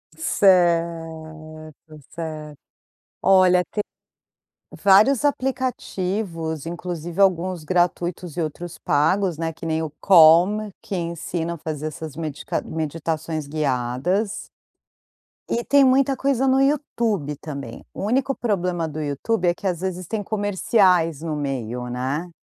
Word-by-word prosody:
Certo, 165 - 0 0.4
certo. 155 -3 -7 0.7
Olha, 185 -2 +5
tem, 210 - -1 1.0
vários 215 +8 +5
aplicativos, 195 - -2
inclusive 175 0 -5
alguns 185 -2 +2
gratuitos 175 -1 -1
e - - -1
outros 160 +2 -5
pagos, 175 +3 +1
né, 165 0 -2
que 165 - -11
nem 160 0 -1
o 160 - -4
Calm, 185 +4 +6
que 195 - -4
ensina 170 0 -3
a - - -10
fazer 155 -1 -5
essas 155 -1 -7
medica 155 -3 -3
meditações 160 0 -3
guiadas. 150 - -1 1.0
E 235 - -1
tem 280 +2 +5
muita 270 +1 +3
coisa 270 0 +1
no 265 +1 +4
YouTube 230 - 0
também. 140 -7 -8
O - - -7
único 265 +4 +1
problema 180 -7 -1
do 155 +1 -5
YouTube 155 +8 -1
é 175 - +4
que - - -13
às 180 -2 -1
vezes 185 -1 -3
tem 220 +1 -2
comerciais 190 -6 +2
no 155 -2 -2
meio, 125 -4 -3
né. 135 +8 -3
170 Hz, 125 wpm, -22 LUFS, 155-200 Hz, 1.0 s, Calm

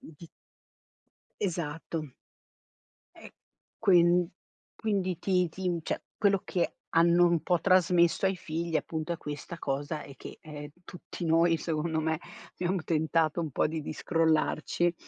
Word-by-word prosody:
di 160 +1 -13 1.1
Esatto. 160 -5 -3 1.0
E - - -13 0.5
quin 175 -4 +4 0.5
quindi, 190 -5 -1
ti 180 -2 +2
ti 180 0 -2
cioè - - -3
quello 200 -2 +3
che 175 - -1 0.2
hanno 170 +1 +5
un 170 -3 +2
po' 175 -1 +1
trasmesso 180 -1 +4
ai 190 0 +1
figli, 165 0 -2
appunto, 160 +1 -3
è 170 - -3
questa 150 +3 -7
cosa 145 +1 -3
e 140 - -11
che - - -10
ehm, 150 -1 -8 0.2
tutti 180 0 -8
noi, 165 +1 +4
secondo 160 0 -1
me 160 0 0 0.3
abbiamo 180 0 -1
tentato 160 0 +1
un 160 -2 -3
po' - - +1
di 160 +1 -3
di 150 - -5
scrollarci 165 +1 +1
170 Hz, 135 wpm, -29 LUFS, 155-175 Hz, 1.1 s, hanno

